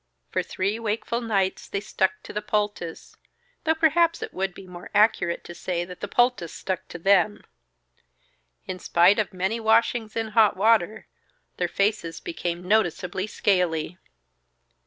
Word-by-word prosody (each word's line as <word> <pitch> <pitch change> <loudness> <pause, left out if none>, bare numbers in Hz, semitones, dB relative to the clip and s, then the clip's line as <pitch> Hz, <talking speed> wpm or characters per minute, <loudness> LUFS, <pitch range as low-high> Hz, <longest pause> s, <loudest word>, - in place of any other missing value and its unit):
For - - +1
three 200 +4 -2
wakeful 225 +1 -2
nights 200 -5 -1
they 200 - -2
stuck 190 -1 -1
to - - -9
the 210 - -2
poultice 205 -6 -3 0.5
though 320 0 +3
perhaps 330 +1 +3
it - - -7
would 190 -1 -2
be 195 - -11
more 180 -1 -10
accurate 205 -5 +3
to 175 - -9
say 175 0 -3
that 180 0 -10
the 205 - -4
poultice 240 -7 +1
stuck 190 -2 -4
to - - -8
them. 195 +3 +3 1.2
In 185 - -5
spite 180 +5 +4
of 215 - 0
many 190 +4 -1
washings 220 0 +2
in 225 -1 -2
hot 215 -2 +4
water, 220 0 +2 0.5
their - - 0
faces 200 -5 -1
became 175 +1 -4
noticeably 185 -2 +1
scaly. 180 -5 0
200 Hz, 150 wpm, -25 LUFS, 180-220 Hz, 1.2 s, spite